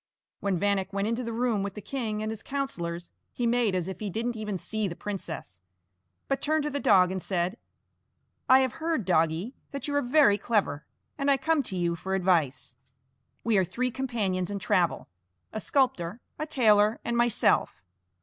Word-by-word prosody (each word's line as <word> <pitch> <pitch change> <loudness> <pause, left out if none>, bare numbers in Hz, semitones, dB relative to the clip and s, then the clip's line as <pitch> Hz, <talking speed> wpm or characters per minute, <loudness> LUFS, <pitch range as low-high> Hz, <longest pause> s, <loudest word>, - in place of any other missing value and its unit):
When 200 -2 0
Vanek 200 0 0
went 200 +1 -1
into 230 +2 -1
the 230 - -4
room 230 -2 0
with 200 0 -4
the - - -5
king 215 -2 -3
and 215 - -2
his 220 - -6
councillors, 175 -12 -4 0.2
he 245 - -2
made 230 -4 +2
as 180 -1 -1
if 190 - -6
he 210 - -3
didn't 230 +5 -2
even 210 -3 -3
see 215 +3 -2
the 170 - -5
princess, 170 - -6 0.7
but 275 - -1
turned 310 0 +1
to 300 - -2
the 285 - -2
dog 185 -9 +5
and 190 0 -3
said: 180 +1 -1 0.9
"I 260 +1 +8
have 260 -2 +1
heard, 320 - 0
doggie, 165 - +1 0.2
that 280 +1 -5
you 290 - -2
are 285 - +3
very 250 -5 +4
clever, 195 -11 0 0.3
and 280 0 +1
I 275 - +5
come 315 +2 +2
to 195 -8 -4
you 170 -1 0
for 190 +3 -3
advice. 165 -9 +1 0.7
We 225 -4 +3
are - - +3
three 250 +8 -2
companions 210 -9 -1
in 205 - -3
travel, 180 -3 +1 0.5
a 215 - -2
sculptor, 235 -7 0 0.2
a 310 - -2
tailor, 215 -6 +4
and 235 - -1
myself. 240 - +2
210 Hz, 190 wpm, -28 LUFS, 185-250 Hz, 0.9 s, I